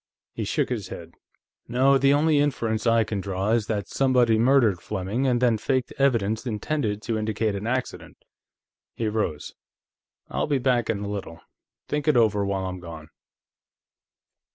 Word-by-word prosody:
He - - -4
shook - - 0
his - - -3
head. - - -9 0.5
"No, 135 +3 +3
the 135 +1 +4
only 150 +1 +3
inference 120 -6 0
I 115 0 +4
can 105 -2 -3
draw 95 +2 -2
is 115 -2 +1
that 105 -3 -2
somebody 125 -4 +2
murdered 115 -7 +3
Fleming, 105 +8 -2
and 125 -2 +2
then 120 -3 +2
faked 130 +2 -1
evidence 115 -6 +1
intended 110 -2 -2
to 115 -2 -1
indicate 110 0 -1
an 100 +2 -4
accident." 125 +1 -4 0.8
He 115 - -2
rose. 105 -9 -2 0.7
"I'll - - -2
be 145 -2 +1
back, 125 -3 +1
in 105 -3 -1
a 100 - -4
little; 100 -5 -6 0.5
think 150 +1 -2
it 150 -5 +4
over, 105 -3 +3
while 100 -1 -2
I'm 95 0 -5
gone." 80 -3 -10
115 Hz, 160 wpm, -25 LUFS, 100-130 Hz, 0.8 s, the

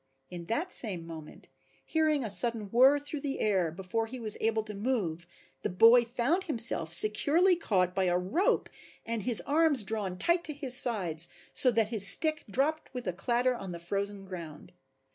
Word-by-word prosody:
In 175 -1 -8
that 310 - -3
same 185 -8 0
moment, 160 -2 -12 0.4
hearing 310 -3 0
a 225 - -5
sudden 220 -2 +1
whirr 260 +4 +5
through 290 0 -7
the 275 -1 -5
air, 190 -6 0
before 190 +7 -4
he 255 +3 -8
was 215 -3 -2
able 225 0 -1
to 215 -1 -8
move 200 -7 -3 0.3
the - - -3
boy 230 +6 +5
found 255 +11 -2
himself 225 - +2
securely 290 - +3
caught 185 - -1
by 190 0 -1
a 175 -1 +1
rope 225 - -1 0.4
and 230 -1 -4
his 235 +2 +1
arms 295 -4 +2
drawn 195 -3 -4
tight 340 - +1
to 305 - -2
his 280 -3 -3
sides 180 -10 0 0.3
so 255 - +5
that 225 -3 0
his 210 -4 +7
stick 310 +5 +4
dropped 290 +9 -2
with 250 - -6
a 180 - -3
clatter 240 +6 -1
on 195 -7 -8
the - - -7
frozen 200 +3 -5
ground. 170 -5 -10
225 Hz, 180 wpm, -28 LUFS, 185-265 Hz, 0.4 s, his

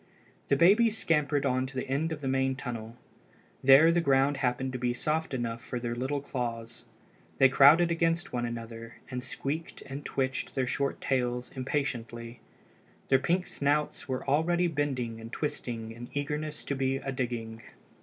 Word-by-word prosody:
The - - +3
babies 210 +8 +5
scampered 150 -5 +1
on 130 +1 +1
to 135 - -11
the 130 - -3
end 145 +5 0
of 155 -2 -4
the 135 - -3
main 130 0 +1
tunnel. 120 -3 -6 0.7
There 135 +5 +8
the 175 0 +2
ground 140 -1 +3
happened 130 0 -1
to 125 - -3
be 120 0 0
soft 155 +5 -1
enough 120 -3 -3
for 125 - -4
their 120 0 -3
little 130 +4 -2
claws. 115 -4 -5 0.5
They 135 - +6
crowded 155 +6 +6
against 165 +1 0
one 120 -1 -1
another, 115 -1 -6 0.2
and 125 0 -3
squeaked 140 +5 -4
and 135 +2 -7
twitched 130 -1 -2
their 130 -2 +1
short 140 +2 -1
tails 125 -1 -1
impatiently. 120 -4 -3 0.7
Their 135 - +5
pink 180 +6 +1
snouts 145 0 -1
were 130 +1 -3
already 170 +5 +2
bending 135 -8 -2
and 115 +1 -9
twisting 120 -6 -4
in 120 +1 -9
eagerness 150 +1 -3
to - - -2
be 135 0 0
a 135 0 -4
digging. 120 -3 -4
135 Hz, 165 wpm, -29 LUFS, 120-145 Hz, 0.7 s, There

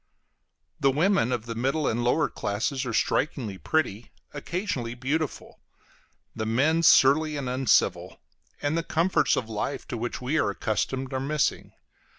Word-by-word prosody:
The 140 - +3
women 150 - +2
of 120 -3 -2
the 115 - -4
middle 135 +6 0
and 120 +2 0
lower 150 +6 +2
classes 125 +6 -2
are - - -2
strikingly 115 -4 -1
pretty, 120 -9 -1 0.2
occasionally 145 - -3
beautiful; 140 +4 -3 0.8
the 110 - -3
men 145 +9 +2
surly 155 0 +5
and 140 -3 -4
uncivil; 130 0 +1 0.4
and 145 +2 0
the 165 - +1
comforts 165 +2 +1
of 115 - -2
life 110 +5 -4
to 120 - -3
which 120 +2 -4
we 140 +5 0
are - - +1
accustomed 125 +6 -2
are 130 - -1
missing. 150 +3 -1
135 Hz, 150 wpm, -26 LUFS, 120-155 Hz, 0.8 s, surly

